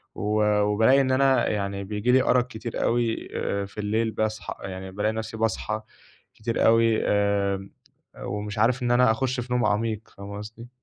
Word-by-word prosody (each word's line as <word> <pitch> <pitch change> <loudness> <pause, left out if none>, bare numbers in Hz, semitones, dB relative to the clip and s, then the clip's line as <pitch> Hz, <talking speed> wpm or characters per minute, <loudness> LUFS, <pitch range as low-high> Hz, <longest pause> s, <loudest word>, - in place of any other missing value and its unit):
و 105 +1 0 0.2
وبالاقي 110 +6 +4
إن 130 -1 0
أنا 135 0 +3
يعني 100 -1 -2
بييجي 105 +4 -1
لي 130 0 +5
أَرَق 125 0 +2
كتير 115 -2 -5
أوي 115 -1 0
آآ، 100 0 -2
في 100 - -16
الليل 110 +2 0
باصحى 110 0 -3
آآ، - - -4
يعني 95 0 -7
بالاقي 105 +3 -1
نَفْسي 110 0 -5
باصحى 110 -1 -1 0.5
كتير 115 +1 -1
أوي 115 0 +4
آمم، 100 -1 0 0.5
ومش 105 +1 -5
عارف 125 +4 +2
إن 120 - +1
أنا 120 -1 +5
أخُشّ 125 +2 -1
في 125 0 -4
نوم 125 0 +2
عميق 110 +1 -1
فاهمة 100 +1 -7
قصدي؟ 110 +3 -9
110 Hz, 175 wpm, -25 LUFS, 105-120 Hz, 0.5 s, لي